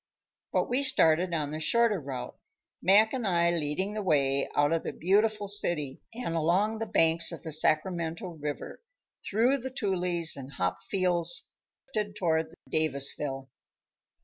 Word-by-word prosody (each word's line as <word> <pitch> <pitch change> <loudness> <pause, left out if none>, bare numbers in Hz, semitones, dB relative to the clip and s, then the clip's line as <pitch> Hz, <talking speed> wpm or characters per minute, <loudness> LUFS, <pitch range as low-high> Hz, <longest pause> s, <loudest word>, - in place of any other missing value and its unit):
But - - 0
we 250 +3 +1
started 175 - +3
on 150 -3 -2
the 155 - -4
shorter 230 +4 +2
route, 130 -3 -6 0.5
Mac 210 +6 +4
and 250 -5 -2
I 170 -2 +2
leading 170 +5 -2
the 215 - -3
way 140 -6 +1
out 145 +1 +3
of 165 -1 +1
the - - -5
beautiful 205 +3 +1
city 175 -9 +3
and 235 -7 -4
along 185 +7 +1
the 225 - -3
banks 165 -3 +2
of - - -9
the 160 - -6
Sacramento 165 +4 0
River, 150 -3 -6 0.4
through 240 +7 +1
the 260 +1 -5
toolies 180 -8 0
and 140 0 -9
hop 90 -4 -2
fields 175 -3 0 0.7
towards 160 -3 -1
Davisville. 140 -3 0
170 Hz, 145 wpm, -28 LUFS, 150-205 Hz, 0.7 s, Mac